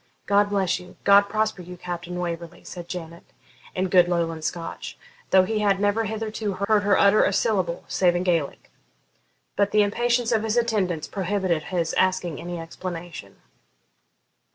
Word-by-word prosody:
'God 205 0 +3
bless 195 -3 +1
you! 180 0 -14
God 200 0 +6
prosper 215 -2 -1
you, 180 +1 -10
Captain 175 0 -6
Waverley!' 170 -1 -5
said 175 -1 -9
Janet, 170 -2 -7 0.5
in 185 +1 0
good 180 -1 +5
Lowland 165 -2 -1
Scotch, 165 +1 -5 0.3
though 190 -1 +6
he 215 +3 -1
had 200 -2 +2
never 205 +2 +1
hithero 215 -1 -3
heard 215 -1 +4
her 200 -1 +3
utter 200 +1 +5
a - - +2
syllable, 190 -5 0
save 175 -2 +2
in 175 - 0
Gaelic. 170 -6 -1 0.8
But 200 0 +2
the 210 0 +4
impatience 240 +3 +1
of 225 -2 +2
his 220 +1 -1
attendants 195 -9 0
prohibited 185 -5 -1
his 170 -2 -1
asking 185 -4 0
any 175 0 -5
explanation. 170 0 -8
185 Hz, 155 wpm, -24 LUFS, 175-205 Hz, 0.8 s, God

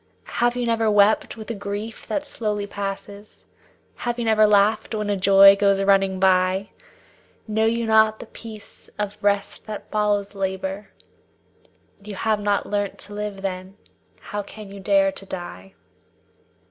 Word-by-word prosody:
Have 240 0 +3
you 245 -1 -1
never 225 -1 +1
wept 210 +2 +3
with 220 +1 -7
a - - -2
grief 205 +2 -6
that 295 -1 -2
slowly 210 -6 -3
passes; 200 +1 -7 0.5
Have 240 0 -3
you 240 - -2
never 215 -1 +4
laughed 210 +2 +2
when 210 -1 -2
a - - +1
joy 195 +1 +7
goes 200 -1 +2
running 195 -1 +3
by? 185 +1 +2 0.8
Know 220 +1 +1
you 230 +1 0
not 220 0 +4
the - - -9
peace 220 -2 -11
of 205 -1 -3
rest 200 0 -1
that 215 -1 -7
follows 205 -1 0
labor? 190 +1 -4 1.1
You 205 -1 -7
have 215 +2 0
not 205 -1 0
learnt 205 -1 -2
to 205 - -8
live 205 -1 -5
then; 190 +1 -5 0.4
how 205 - -5
can 205 0 -11
you 200 - -9
dare 195 0 +3
to 195 - -8
die? 95 - -8
205 Hz, 155 wpm, -23 LUFS, 195-215 Hz, 1.1 s, joy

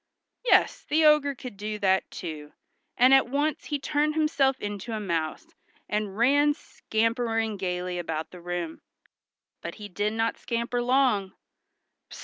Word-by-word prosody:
Yes, - - +3
the 310 +1 +3
ogre 300 -2 +5
could 245 -5 -9
do 210 +1 -4
that, 190 -2 +2
too, 150 -4 -7 0.4
and 255 +2 +6
at 270 -2 +6
once 290 +2 -1
he 295 - -1
turned 300 +2 0
himself 280 -4 +2
into 205 +2 -5
a 220 - -2
mouse, 165 -6 -2 0.4
and 210 -2 -2
ran, 285 +5 +4
scampering 225 -3 -1
gayly 180 -2 -3
about 160 -2 -4
the 180 - -11
room. 175 -2 -4 0.8
But - - -6
he 210 -1 -9
did 205 +3 -1
not 225 +1 -1
scamper 235 +1 -2
long. 245 -6 +2
225 Hz, 140 wpm, -27 LUFS, 190-270 Hz, 0.8 s, and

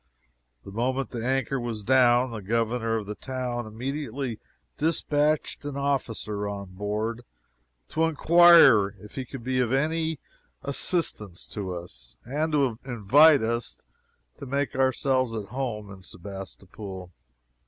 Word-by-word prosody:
The - - -9
moment 130 +4 -1
the 115 -2 -4
anchor 135 +1 0
was 115 -3 -4
down, 125 0 +4
the 110 -2 -6
Governor 115 +2 0
of 110 -2 -2
the 105 - -5
town 125 -1 -4
immediately 130 +1 -4 0.4
dispatched 150 -1 +1
an 145 -1 -5
officer 115 -7 -2
on 100 -2 -6
board 105 +4 -3 0.7
to 160 +1 +1
inquire 165 - +6
if 105 +1 -13
he 130 - -4
could 130 -1 -9
be 130 +1 0
of 125 -2 +1
any 160 +3 0 0.5
assistance 140 - -2
to 95 -3 -4
us, - - -10
and 150 +6 -1
to 135 -6 +1
invite 135 +4 +5
us 115 +1 -3 0.6
to 140 - -7
make 140 +2 -1
ourselves 130 -2 +1
at 105 -3 -5
home 110 -5 -4
in 95 -1 -11
Sebastopol! 95 0 -9
120 Hz, 130 wpm, -26 LUFS, 105-135 Hz, 0.7 s, inquire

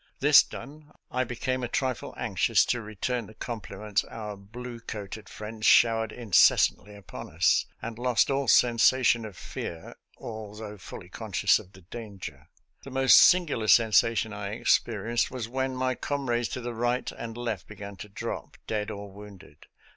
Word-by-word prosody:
This - - +8
done, 150 +1 -10 0.2
I 130 - +1
became 130 +1 -3
a - - -1
trifle 130 -2 -2
anxious - - +2
to 120 - -1
return 110 +2 -3
the 110 - -15
compliments 105 -3 -3
our 105 -2 -7
blue 120 +5 -9
coated 105 -1 -7
friends 110 +1 -4
showered 115 -2 +5
incessantly 105 -2 +3
upon 100 -2 -9
us, 80 +3 +2 0.2
and 115 0 -6
lost 125 +2 +2
all 135 0 0
sensation 120 0 +4
of 100 -5 -10
fear, 80 -1 -7 0.2
although 105 -1 -8
fully - - -10
conscious - - +1
of 95 - -15
the 95 - -15
danger. 95 - -9 0.3
The - - -9
most 135 0 +5
singular 160 -11 +5
sensation 115 0 +4
I 100 -1 -5
experienced 115 0 +1
was 125 -3 -5
when 130 +2 -2
my 130 0 0
comrades 120 -4 -2
to - - -5
the 120 0 -4
right 120 +2 -1
and 115 0 -8
left 115 -7 -4
began 100 -1 -9
to 105 - -9
drop, 100 - -6
dead 105 -1 -2
or 100 -1 -7
wounded. 100 -7 -14
115 Hz, 155 wpm, -27 LUFS, 105-125 Hz, 0.3 s, This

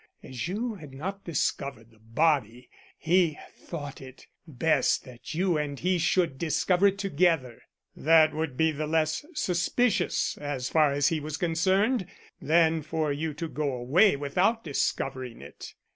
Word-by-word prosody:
As 130 +4 -5
you 220 +6 -2
had 150 -9 -11
not 195 +7 -6
discovered 140 -7 -3
the 110 - -24
body, 125 0 0 0.3
he 170 -2 +2 0.2
thought 145 -5 -8
it 130 -1 -12 0.2
best 155 +2 +1
that 125 +3 -10
you 175 -2 +1
and 145 -2 -4
he 180 0 +1
should 165 -4 +1
discover 175 +4 +2
it 200 0 0
together. 165 - 0 0.3
That 160 0 +4
would 155 -4 -3
be 160 0 +2
less 155 - 0
suspicious, 215 - 0
as 145 -3 -3
far 155 -3 +3
as 140 0 +2
he 160 - -1
was 150 +1 -5
concerned, 190 +6 +1 0.3
than 160 0 +3
for 155 -1 -2
you 150 +1 -3
to 165 +2 -4
go 150 -2 -2
away 140 - +4
without 180 +11 0
discovering 130 -4 -2
it. - - -11
155 Hz, 145 wpm, -27 LUFS, 140-175 Hz, 0.3 s, That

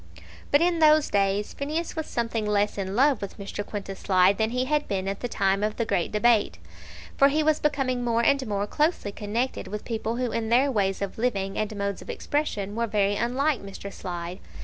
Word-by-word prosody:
But 285 - +4
in 345 -1 +2
those 310 -1 +5
days 200 +1 +1
Phineas 310 +4 -3
was 315 -1 -3
something 230 -2 -2
less 210 0 +1
in 190 0 -3
love 270 +1 +3
with 200 - -6
Mr. 200 0 -5
Quintus 195 -2 -6
Slide 190 +1 +3
than 220 0 +2
he 250 +2 -1
had 295 +2 0
been 195 -1 -2
at 195 0 -3
the 245 - -3
time 195 -3 +1
of 210 +1 -1
the 230 - 0
great 175 -6 0
debate, 215 - +3 0.6
for 275 - +6
he 305 +2 +1
was 310 0 +2
becoming 265 -4 0
more 235 -1 +1
and 275 -2 +2
more 205 -1 -1
closely 300 - 0
connected 215 +3 -3
with 210 +2 -6
people 225 0 -2
who 245 -1 -1
in 225 -1 -2
their 260 +4 +4
ways 200 -4 0
of 200 +2 -5
living 195 -5 -1
and 215 0 -2
modes 200 -1 -3
of - - -12
expression 210 -9 -2
were 235 0 0
very 205 -1 +1
unlike 255 +5 0
Mr. 200 0 -8
Slide. 175 0 -6
220 Hz, 210 wpm, -26 LUFS, 200-260 Hz, 0.6 s, for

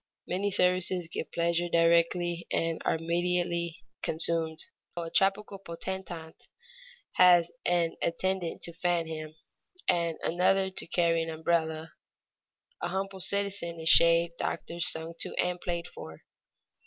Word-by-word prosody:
Many 195 +3 -1
services 180 -2 +2
give 160 - -5
pleasure 170 +1 0
directly 170 +1 +2
and 165 -1 -1
are - - +1
immediately 170 +1 -1 0.2
consumed. 160 -1 +1 0.3
A 165 -1 -4
tropical 195 +1 +1
potentate 170 -2 -7 0.7
has 175 -2 +6 0.2
an 175 -2 +1
attendant 185 0 -1
to 170 - +1
fan 175 0 0
him, 155 -1 -7 0.5
and 170 -2 +1
another 190 +2 +2
to 185 - -4
carry 165 -1 +2
an 165 - -3
umbrella; 160 0 -1 0.9
a - - -1
humble 195 0 -3
citizen 195 -3 -2
is 160 0 +3
shaved, 170 0 +5
doctored, 170 0 -4
sung 165 -1 +1
to, - - -3
and 180 0 -1
played 170 -1 -3
for. 80 0 -11
170 Hz, 125 wpm, -29 LUFS, 165-180 Hz, 0.9 s, has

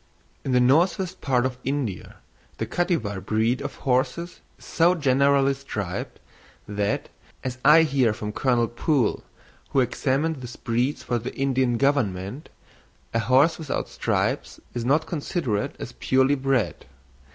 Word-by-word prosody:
In 135 - -2
the 125 - +4
northwest 175 +8 +2
part 130 -2 +1
of 125 -1 -3
India 135 -8 -3 0.4
the - - -2
Kattywar 115 - -1
breed 110 +5 +1
of - - -5
horses 130 +7 0 0.2
is - - -17
so 170 +2 +3
generally 140 -2 +3
striped, 105 -9 -5 0.5
that, 105 0 -2 0.3
as 130 0 -4
I 160 +2 +7
hear 135 -6 +2
from 105 -1 -5
Colonel 120 0 +1
Poole, 120 +1 0 0.5
who 135 - +2
examined 135 +5 0
this 125 -2 -8
breed 120 +5 -1
for 120 -1 -2
the 120 +3 -6
Indian 130 -3 +1
Government, 120 -3 0 0.6
a 115 - +2
horse 130 +9 +3
without 155 -3 -3
stripes - - -1
is 120 - -3
not 150 +6 +2
considered 145 - -2
as - - -7
purely 130 +2 +2
bred. 135 -4 0
130 Hz, 140 wpm, -24 LUFS, 120-145 Hz, 0.6 s, I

